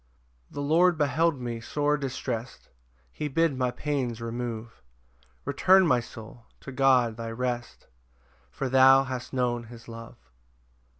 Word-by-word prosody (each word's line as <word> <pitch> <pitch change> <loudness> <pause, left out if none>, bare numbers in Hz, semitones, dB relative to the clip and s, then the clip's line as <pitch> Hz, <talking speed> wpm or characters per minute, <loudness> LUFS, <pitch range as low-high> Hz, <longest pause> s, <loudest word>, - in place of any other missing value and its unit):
5 - - -20
The 145 - -3
Lord 170 +4 +3
beheld 155 0 +1
me 120 -2 -4
sore 145 +5 0
distrest, 125 -4 -5 0.4
He 150 - -4
bid 160 +1 +1
my 130 -1 0
pains 130 -4 -3
remove: 115 -1 -6 0.6
Return, 185 +7 +4
my 130 -7 +3
soul, 115 0 -11
to 140 - -8
God 130 -4 +3
thy 115 -1 -5
rest, 120 +1 -4 0.6
For 135 - -4
thou 135 +1 +6
hast 130 -2 -6
known 120 -2 -1
his 115 0 -13
love. 115 0 -10
125 Hz, 135 wpm, -27 LUFS, 120-145 Hz, 0.6 s, thou